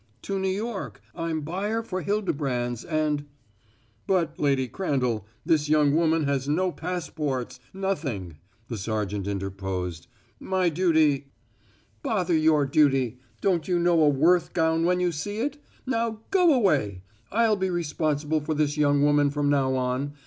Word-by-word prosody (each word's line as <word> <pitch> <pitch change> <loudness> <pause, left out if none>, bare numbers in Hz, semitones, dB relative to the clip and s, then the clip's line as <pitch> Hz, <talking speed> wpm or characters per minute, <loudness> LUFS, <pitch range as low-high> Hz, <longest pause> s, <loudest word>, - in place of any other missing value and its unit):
"To 195 -1 -2
New 190 0 0
York. 195 - -4
I'm 165 +2 -2
buyer 200 +9 -2
for 185 -4 -4
Hildebrand's, 140 - -1
and 155 -3 -1 0.4
" 110 +1 -37
"But, 170 -5 0
Lady 135 -3 +2
Crandall, 125 - -1 0.2
this 150 -2 +2
young 150 -2 +4
woman 165 -1 +2
has 140 -1 -1
no 180 +5 +1
passports 150 -8 -4
nothing," 140 - -3 0.3
the 115 - -5
sergeant 105 -2 -2
interposed. 95 -3 -4 0.3
"My 185 -2 +1
duty 155 -5 +2 0.4
" - - -33 0.3
"Bother 180 - 0
your 155 -2 +4
duty! 135 -4 +2 0.2
Don't 180 -5 +1
you 180 -2 +2
know 170 -1 +3
a 150 - +6
Worth 160 +5 +3
gown 165 -1 +2
when 180 +1 +2
you 180 -1 +1
see 205 +7 -4
it? 285 +6 -2 0.3
Now 230 -3 -1
go 360 -4 +5
away! 140 - +1 0.3
I'll 225 0 +3
be 190 -1 -1
responsible 155 -2 -1
for 155 +2 -2
this 150 0 0
young 145 -1 +3
woman 145 0 +4
from 145 0 0
now 135 -2 +2
on. 130 +3 -1
155 Hz, 150 wpm, -26 LUFS, 135-180 Hz, 0.4 s, a